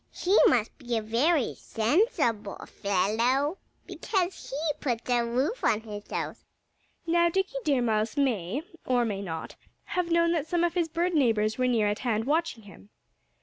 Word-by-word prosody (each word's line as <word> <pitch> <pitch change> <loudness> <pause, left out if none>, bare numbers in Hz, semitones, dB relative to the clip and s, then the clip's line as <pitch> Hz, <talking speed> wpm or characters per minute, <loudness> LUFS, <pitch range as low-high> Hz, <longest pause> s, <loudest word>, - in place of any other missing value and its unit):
He 375 +3 0
must 230 -3 +1
be 240 -4 -2
a - - -1
very 255 +6 +1
sensible 230 - 0
fellow, 230 - 0 0.3
because 375 -3 -2
he 275 - -4 0.2
puts 240 -4 -2
a 240 -1 +3
roof 260 - -1
on 215 - +2
his 210 -2 -9
house." - - -4 0.6
Now, 340 +1 +3
Dickie 385 +7 -1
Deer 275 -5 +2
Mouse 220 +2 0
may 250 - 0 0.2
or 245 -2 +1
may 200 -3 -3
not 160 -4 -6 0.3
have 360 -1 -2
known 335 0 +3
that 325 -3 -1
some 345 0 +1
of 345 -1 +1
his 345 -2 0
bird 340 +3 0
neighbors 225 -6 +2
were 255 - +2
near 230 -4 +2
at 205 0 -1
hand, 225 -3 -1
watching 305 -5 0
him. 150 - -15
250 Hz, 165 wpm, -27 LUFS, 220-335 Hz, 0.6 s, a